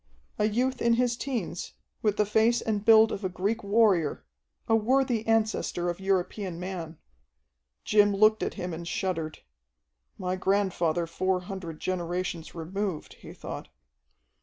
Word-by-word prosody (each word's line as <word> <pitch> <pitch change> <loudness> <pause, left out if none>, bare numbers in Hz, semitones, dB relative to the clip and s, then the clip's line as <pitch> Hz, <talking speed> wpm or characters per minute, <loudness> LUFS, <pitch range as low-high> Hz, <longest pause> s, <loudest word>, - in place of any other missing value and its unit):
A 210 - +3
youth 250 +4 0
in 235 0 +4
his 245 0 +1
teens, 235 -10 -4 0.3
with 210 -2 +1
the 210 - +3
face 220 +3 +3
and 210 -2 -2
build 220 0 +7
of 200 - -4
a 185 - 0
Greek 200 +5 -2
warrior, 200 -7 +2 0.4
a 225 - +4
worthy 245 0 +2
ancestor 215 -5 +1
of 175 - -9
European 190 -1 -1
man. 175 -3 -5 0.9
Jim 205 -1 +4
looked 215 +2 +4
at - - -2
him 180 -1 -4
and 170 +1 -6
shuddered. 165 -4 -3 0.7
"My 180 0 -2
grandfather 185 -4 +1
four 185 +2 -1
hundred 180 -4 -7
generations 175 -2 -3
removed," 180 +1 -4
he - - -10
thought. - - -7
195 Hz, 140 wpm, -28 LUFS, 175-220 Hz, 0.9 s, build